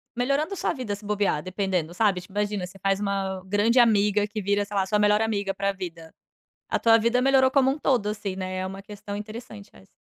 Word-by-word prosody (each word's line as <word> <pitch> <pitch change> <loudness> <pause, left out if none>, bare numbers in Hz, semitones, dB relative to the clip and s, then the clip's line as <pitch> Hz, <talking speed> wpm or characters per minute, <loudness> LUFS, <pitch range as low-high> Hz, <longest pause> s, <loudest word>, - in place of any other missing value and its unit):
melhorando 280 +8 0
a - - -3
sua - - -1
vida, 240 -8 -4
se 205 - -14
bobear, 205 -7 0
dependendo, 185 -3 -2
sabe, 195 -2 +1
tipo, 180 +2 -16
imagina, 205 -2 -1
você 190 +2 -13
faz 195 +1 +1
uma 195 -2 -2
grande 205 +5 +2
amiga 210 -3 +4
que 215 0 -5
vira, 200 +1 +1
sei 205 - -8
lá, 195 -1 +2
sua 210 +2 +1
melhor 210 +1 +4
amiga 205 -3 -1
pra 200 +1 -1
vida. 170 -4 -8 0.6
A - - 0
tua 225 0 +5
vida 235 +3 +2
melhorou 265 0 +4
como 265 -1 +3
um 285 - -2
todo, 245 -8 +1
assim, 205 -2 -3
né, 185 0 -4
é 185 - -2
uma 195 +1 -7
questão 205 0 -8
interessante, 215 0 -9
essa. 95 - -18
205 Hz, 230 wpm, -25 LUFS, 195-225 Hz, 0.6 s, tua